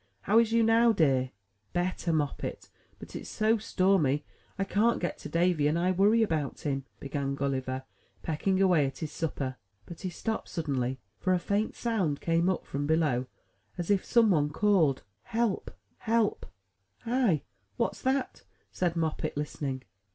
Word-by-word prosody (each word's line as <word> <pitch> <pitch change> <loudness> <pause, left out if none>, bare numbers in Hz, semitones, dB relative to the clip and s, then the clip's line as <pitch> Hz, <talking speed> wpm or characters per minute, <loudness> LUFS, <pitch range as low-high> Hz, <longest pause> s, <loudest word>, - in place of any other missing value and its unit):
How 215 +3 +4
is 230 -1 +2
you 230 0 +4
now, 230 +1 +5
dear?" 135 -8 +2 0.5
''Better, 175 -1 0
Moppet; 150 -3 -2 0.3
but, - - -11
it's - - -6
so 220 +1 +2
stormy, 185 -9 +2 0.3
I 195 - +1
can't 215 +4 +2
get 175 - -3
to - - -7
Davy; 170 -3 +2
and 155 +3 +1
I 180 +2 +2
worry 205 +5 +4
about 155 -9 -2
him," 135 -2 -2
began 140 0 -3
Gulliver, 130 -1 -2 0.4
pecking 185 +5 0
away 180 -7 +4
at 135 - -7
his 155 -3 -5
supper; 135 -5 -3 0.3
but 170 - -10
he 185 - -2
stopped 220 +5 -3
suddenly^ 130 -5 -2 0.2
for 185 - +1
a - - +4
faint 200 +4 -1
sound 195 -12 0
came 170 +2 +2
up 185 - -1
from 145 +1 -3
below, 150 -6 +1 0.5
as 175 +2 -1
if 200 -2 +3
some 230 -3 +4
one 150 -4 +2
called, 160 -5 +2 0.2
"Help, 225 -3 -1 0.3
help!" 225 -2 +1 0.6
'*Hi! 230 - +2 0.3
what's - - -1
dat?" 265 0 -1 0.3
said 175 -2 -1
Moppet, 160 -3 -2
listening. 140 -3 -3
170 Hz, 160 wpm, -29 LUFS, 145-205 Hz, 0.6 s, now